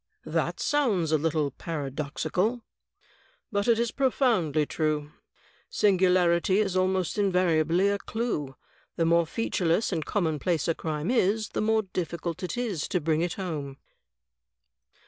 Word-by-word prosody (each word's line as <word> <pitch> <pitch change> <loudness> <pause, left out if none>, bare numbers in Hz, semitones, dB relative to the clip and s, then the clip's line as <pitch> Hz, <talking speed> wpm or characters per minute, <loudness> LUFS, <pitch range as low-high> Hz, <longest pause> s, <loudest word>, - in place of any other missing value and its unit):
"That - - -1
sounds 220 - +1
a 155 - +4
little 155 -2 0
paradoxical." 155 - -2 0.9
"But 200 0 0
it 230 -2 +4
is 235 0 0
profoundly 225 - +1
true. 150 -1 -1 0.6
Singularity 185 -2 +3
is 200 -3 +1
almost 185 0 0
invariably 180 -2 +2
a 200 0 0
clew. 200 - -3 0.4
The 165 - +1
more 170 0 +3
featureless 195 -1 0
and 160 -3 -1
commonplace 165 -2 -1
a 165 - +2
crime 155 +4 -3
is, 215 -2 +1
the - - -2
more 220 0 +2
difficult 170 -2 -4 0.2
is 215 -11 -2
it - - -8
to 180 - +1
bring 160 0 0
it 175 -1 -1
home." 150 -8 -5
180 Hz, 130 wpm, -27 LUFS, 155-205 Hz, 0.9 s, a